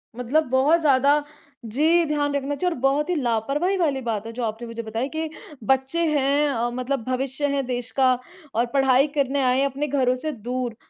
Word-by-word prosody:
मतलब 250 Hz, +6 st, +1 dB
बहुत 275 Hz, +6 st, +4 dB
ज़्यादा 285 Hz, 0 st, +4 dB, 0.4 s
जी, 315 Hz, +9 st, +3 dB
ध्यान 290 Hz, -1 st, 0 dB
रखना 280 Hz, +1 st, -1 dB
चाहिए 355 Hz, +4 st, 0 dB
और -, -, -8 dB
बहुत 280 Hz, +5 st, +1 dB
ही 360 Hz, -, +1 dB
लापरवाही 275 Hz, -, 0 dB
वाली 290 Hz, -7 st, 0 dB
बात 225 Hz, -3 st, -3 dB
है -, -, -6 dB
जो 245 Hz, -, -4 dB
आपने 225 Hz, +1 st, -4 dB
मुझे 230 Hz, 0 st, -5 dB
बताई 225 Hz, +4 st, -3 dB
कि 320 Hz, 0 st, -2 dB, 0.4 s
बच्चे 265 Hz, +6 st, +1 dB
हैं 285 Hz, +2 st, +2 dB
अ, 240 Hz, -2 st, -1 dB
मतलब 255 Hz, 0 st, -2 dB
भविष्य 265 Hz, +3 st, -1 dB
हैं 275 Hz, -1 st, -1 dB
देश 245 Hz, -1 st, -4 dB
का 260 Hz, -2 st, +3 dB, 0.4 s
और 235 Hz, +2 st, +2 dB
पढ़ाई 270 Hz, 0 st, +4 dB
करने 280 Hz, -1 st, +1 dB
आए 255 Hz, -1 st, +2 dB
हैं 275 Hz, -, +3 dB
अपने 280 Hz, +2 st, -2 dB
घरों 260 Hz, -3 st, +1 dB
से 310 Hz, +5 st, -4 dB
दूर 245 Hz, -1 st, -4 dB
270 Hz, 200 wpm, -23 LUFS, 250-290 Hz, 0.4 s, बहुत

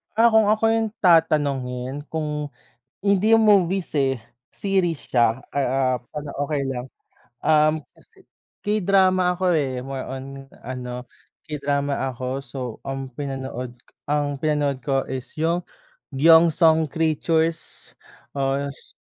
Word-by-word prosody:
Ah, 230 Hz, +1 st, +5 dB
kung 220 Hz, -1 st, +5 dB
ako 215 Hz, +1 st, +2 dB
yung 225 Hz, -1 st, +1 dB
tatanungin, 145 Hz, -5 st, +2 dB
kung, 150 Hz, -2 st, -3 dB, 0.5 s
hindi 200 Hz, +2 st, +2 dB
yung 225 Hz, -1 st, +6 dB
movies, 190 Hz, -3 st, +3 dB
eh, 135 Hz, -4 st, +1 dB, 0.3 s
series 185 Hz, -6 st, 0 dB
siya. 120 Hz, 0 st, +2 dB
Ah, 130 Hz, -2 st, +1 dB
ah, 150 Hz, +1 st, -7 dB
okey 145 Hz, -1 st, -2 dB
lang 125 Hz, -1 st, -4 dB, 0.6 s
um, 155 Hz, 0 st, +4 dB, 0.9 s
K-drama 190 Hz, -3 st, +3 dB
ako, 180 Hz, +1 st, -6 dB
eh, 130 Hz, -4 st, -1 dB
more 135 Hz, 0 st, -5 dB
on 130 Hz, 0 st, -6 dB, 0.4 s
ano 125 Hz, 0 st, -6 dB, 0.4 s
K-drama 145 Hz, -1 st, -1 dB, 0.2 s
ako. 125 Hz, +1 st, -7 dB, 0.2 s
So, 130 Hz, +1 st, -11 dB, 0.3 s
ang 135 Hz, -1 st, -4 dB
pinanood 130 Hz, -3 st, -5 dB, 0.3 s
ang 145 Hz, -1 st, 0 dB
pinanood 145 Hz, -4 st, 0 dB
ko 135 Hz, +1 st, 0 dB
is 130 Hz, -1 st, -6 dB
yung 170 Hz, +2 st, +1 dB, 0.5 s
"경성 160 Hz, +1 st, +5 dB
Creatures" 160 Hz, +1 st, -1 dB, 0.5 s
as 140 Hz, +1 st, -2 dB
145 Hz, 115 wpm, -23 LUFS, 135-170 Hz, 0.9 s, yung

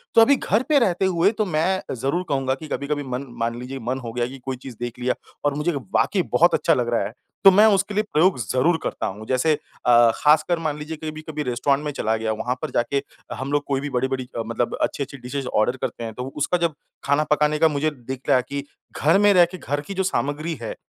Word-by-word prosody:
तो 230 Hz, -, +8 dB
अभी 280 Hz, +5 st, +6 dB
घर 230 Hz, -2 st, 0 dB
पे 295 Hz, -2 st, +5 dB
रहते 190 Hz, -5 st, +1 dB
हुए 185 Hz, +1 st, +3 dB
तो 215 Hz, -, +1 dB
मैं 185 Hz, +2 st, -1 dB
ज़रूर 135 Hz, +9 st, -1 dB
कहूँगा 135 Hz, -2 st, +1 dB
कि 155 Hz, +3 st, -10 dB
कभी-कभी 145 Hz, +1 st, -2 dB
मन 130 Hz, 0 st, -4 dB
मान 115 Hz, +1 st, -1 dB
लीजिए 130 Hz, +2 st, -6 dB
मन 130 Hz, +1 st, -1 dB
हो 115 Hz, -1 st, -6 dB
गया 120 Hz, 0 st, 0 dB
कि 135 Hz, +2 st, -10 dB
कोई 130 Hz, -1 st, -2 dB
चीज़ 130 Hz, -3 st, -8 dB
देख 120 Hz, 0 st, -5 dB
लिया 125 Hz, +1 st, +1 dB, 0.3 s
और 145 Hz, -, +2 dB
मुझे 150 Hz, +4 st, 0 dB
वाक़ई 125 Hz, -9 st, 0 dB
बहुत -, -, +4 dB
अच्छा -, -, +3 dB
लग 120 Hz, -2 st, 0 dB
रहा 115 Hz, -, +2 dB
है 105 Hz, -, -6 dB, 0.3 s
तो 195 Hz, -, +10 dB
मैं 205 Hz, +3 st, +6 dB
उसके 195 Hz, +1 st, 0 dB
लिए 210 Hz, +1 st, +1 dB
प्रयोग 170 Hz, +3 st, +4 dB
ज़रूर 130 Hz, +8 st, +1 dB
करता -, -, -3 dB
हूँ। 105 Hz, +3 st, -7 dB
जैसे 130 Hz, +5 st, +2 dB, 0.3 s
अ, 120 Hz, -1 st, +6 dB
खासकर 155 Hz, +3 st, +3 dB
मान 155 Hz, -3 st, -2 dB
लीजिए 155 Hz, +2 st, -6 dB
कभी, 155 Hz, 0 st, -5 dB
कभी 155 Hz, -1 st, -5 dB
रेस्टोरेंट 140 Hz, +3 st, 0 dB
में 150 Hz, -, -1 dB
चला 110 Hz, -5 st, -1 dB
गया 110 Hz, 0 st, -2 dB
वहाँ 115 Hz, +4 st, -2 dB
पर -, -, -3 dB
जाके 140 Hz, +3 st, 0 dB, 0.3 s
हम 135 Hz, +2 st, -5 dB
लोग 145 Hz, 0 st, +1 dB
कोई 135 Hz, -1 st, 0 dB
भी 145 Hz, -, -4 dB
बड़ी, 125 Hz, -1 st, 0 dB
बड़ी 130 Hz, -1 st, -3 dB, 0.2 s
मतलब 115 Hz, +1 st, -2 dB
अच्छी, 140 Hz, -, 0 dB
अच्छी 140 Hz, +1 st, -9 dB
डिशेज़ 125 Hz, +1 st, -5 dB
ऑर्डर 110 Hz, +4 st, +1 dB
करते -, -, -4 dB
हैं 115 Hz, -1 st, -5 dB
तो 125 Hz, -, -5 dB
उसका 150 Hz, +5 st, +1 dB
जब 170 Hz, -2 st, 0 dB, 0.3 s
खाना 145 Hz, +2 st, +2 dB
पकाने 150 Hz, 0 st, +2 dB
का 160 Hz, -, +6 dB
मुझे 150 Hz, 0 st, 0 dB, 0.2 s
दिख 130 Hz, -1 st, -4 dB
रहा 130 Hz, -, +5 dB
कि 140 Hz, +3 st, -5 dB, 0.4 s
घर 160 Hz, +5 st, +5 dB
में 205 Hz, 0 st, +5 dB
रह 180 Hz, -2 st, +7 dB
के 185 Hz, -, -7 dB
घर 145 Hz, -3 st, -3 dB
की 170 Hz, +7 st, -7 dB
जो 190 Hz, 0 st, 0 dB
सामग्री 155 Hz, -2 st, -1 dB
है 115 Hz, -, -5 dB
140 Hz, 245 wpm, -23 LUFS, 125-160 Hz, 0.4 s, तो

